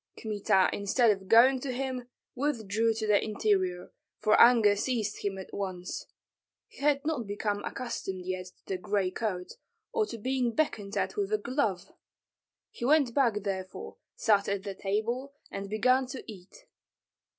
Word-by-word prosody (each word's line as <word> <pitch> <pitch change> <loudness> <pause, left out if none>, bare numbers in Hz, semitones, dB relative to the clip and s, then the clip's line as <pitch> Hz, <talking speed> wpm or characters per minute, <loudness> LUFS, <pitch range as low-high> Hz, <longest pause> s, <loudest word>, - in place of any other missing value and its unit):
Kmita 205 -4 +2
instead 215 +3 +3
of 195 -2 -4
going 250 +5 +6
to 260 +1 -4
him 255 -1 -3 0.3
withdrew 230 -5 0
to 220 0 -2
the 210 -1 +3
interior, 190 -4 0 0.3
for 215 - +2
anger 230 -4 +7
seized 215 -1 -2
him 200 -1 -2
at 190 - -9
once. 185 -2 -4 0.6
He - - -17
had 285 0 +2
not 295 -9 -1
become 205 0 -2
accustomed 190 -7 -5
yet 185 0 -3
to 180 - -19
the 190 - -2
gray 195 -1 0
coat, 185 -3 -4 0.4
or 440 -2 +1
to 230 - -6
being 250 +1 -1
beckoned 210 -10 -1
at 190 -1 -1
with 200 0 -1
a 215 - +3
glove. 215 -5 -2 0.8
He - - -9
went 280 -2 +4
back 230 -7 +2
therefore, 190 -2 -5 0.2
sat 205 -2 +2
at 200 -1 -1
the 200 -1 -4
table, 230 +8 -2 0.2
and 195 0 -5
began 255 +5 +2
to 260 0 -7
eat. 210 - -12
215 Hz, 160 wpm, -29 LUFS, 195-250 Hz, 0.8 s, anger